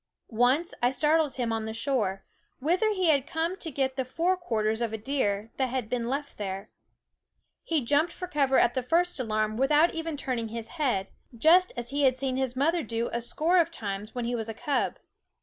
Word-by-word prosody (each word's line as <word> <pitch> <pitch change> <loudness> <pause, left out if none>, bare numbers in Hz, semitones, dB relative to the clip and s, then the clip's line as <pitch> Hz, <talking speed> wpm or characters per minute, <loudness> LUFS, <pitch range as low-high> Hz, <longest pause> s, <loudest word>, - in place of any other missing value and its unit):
Once 250 +9 +2
I 245 - +4
startled 300 +2 +2
him 235 -3 -1
on 225 -1 -2
the 220 0 -5
shore, 225 -6 -1 0.3
whither 350 +10 +1
he 375 -5 +1
had 280 -3 +3
come 330 +2 -1
to 330 - -5
get 265 -2 -1
the 260 - +1
fore 335 +8 0
quarters 220 -10 -1
of 230 -2 -1
a - - -1
deer 215 -3 -1
that 265 -1 +1
had 250 -3 -3
been 240 -2 -1
left 280 -1 -4
there. 195 0 -5 0.9
He 310 -7 -1
jumped 295 +6 +2
for 365 - -6
cover 280 -5 +2
at 240 - +4
the 260 - 0
first 335 +5 +1
alarm 215 -2 -1
without 295 +6 +4
even 325 -2 -3
turning 250 -5 -2
his 225 0 -6
head, 255 - -1 0.3
just 350 +8 +5
as 240 +1 -4
he 285 +1 0
had 260 -2 +4
seen 260 -1 -1
his 260 -1 -1
mother 325 +6 +2
do 230 -2 -2
a 235 - -1
score 320 +9 +1
of 335 -1 +3
times 205 -6 -6
when 245 -1 -2
he 240 - -1
was 225 -2 -2
a 225 - -5
cub. 285 +4 -1
260 Hz, 210 wpm, -28 LUFS, 230-310 Hz, 0.9 s, just